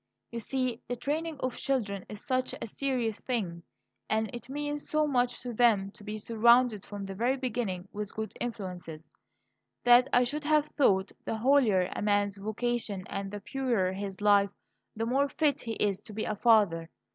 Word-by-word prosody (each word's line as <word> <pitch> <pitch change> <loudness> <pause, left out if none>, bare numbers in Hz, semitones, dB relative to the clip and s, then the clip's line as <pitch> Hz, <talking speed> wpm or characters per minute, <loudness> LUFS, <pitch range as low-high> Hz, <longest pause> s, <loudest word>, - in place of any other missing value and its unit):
You 235 - -4
see, 255 0 -2
the 245 - -2
training 300 +5 -2
of 255 -1 -1
children 215 -8 -2
is 210 -1 -9
such 255 -1 0
a - - -4
serious 235 -2 -2
thing, 190 -10 -2 0.5
and 220 -1 0
it 240 +1 -8
means 290 +1 -3
so 305 0 +2
much 250 -4 +1
to 245 -1 -4
them 215 -4 +3
to 210 - -15
be 210 +1 -5
surrounded 230 0 +3
from 205 -1 -6
the 195 - -6
very 240 +7 +1
beginning 220 -8 -3
with 210 -1 -5
good 220 0 -4
influences, 180 -8 -6 0.7
that 245 +1 +7
I 245 - +5
should 290 +4 -3
have 305 -1 +4
thought 195 -9 +3
the 225 - -2
holier 240 -5 +4
a - - -3
man's 205 -1 +1
vocation 215 -1 -2
and 195 0 -3
the 205 0 -6
purer 235 -7 0
his 195 0 -5
life, 205 -1 +5 0.5
the 225 +1 -1
more 275 +4 +2
fit 290 -1 +1
he 230 - -4
is 205 -2 0
to 215 - -11
be 215 +1 -2
a 215 - -2
father. 205 -7 +3
225 Hz, 180 wpm, -30 LUFS, 200-255 Hz, 0.7 s, that